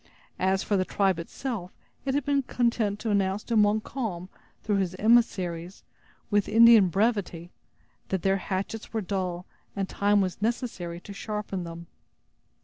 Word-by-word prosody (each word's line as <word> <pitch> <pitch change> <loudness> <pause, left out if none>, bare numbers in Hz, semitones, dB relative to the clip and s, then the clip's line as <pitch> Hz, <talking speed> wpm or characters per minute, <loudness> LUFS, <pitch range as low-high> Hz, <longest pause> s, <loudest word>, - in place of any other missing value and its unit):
As 190 +1 +1
for 205 - +1
the 185 - +2
tribe 190 -2 +1
itself, 195 +2 -5 0.4
it 270 0 0
had 285 -2 0
been 285 -1 +2
content 235 -5 0
to 220 - -1
announce 195 0 +1
to 235 - -2
Montcalm, 210 -3 0 0.3
through 210 -2 +1
his 185 -2 -1
emissaries, 190 -6 +1 0.5
with 205 -1 +2
Indian 225 -2 +7
brevity, 190 -3 -1 0.6
that 190 -3 -1
their 195 0 +3
hatchets 195 +4 -4
were 220 - 0
dull, 185 -2 -3 0.3
and 195 -1 -1
time 205 +1 +2
was 190 0 -1
necessary 215 -7 -2
to 200 - -9
sharpen 200 -3 -4
them. 170 0 -8
200 Hz, 145 wpm, -27 LUFS, 185-225 Hz, 0.6 s, Indian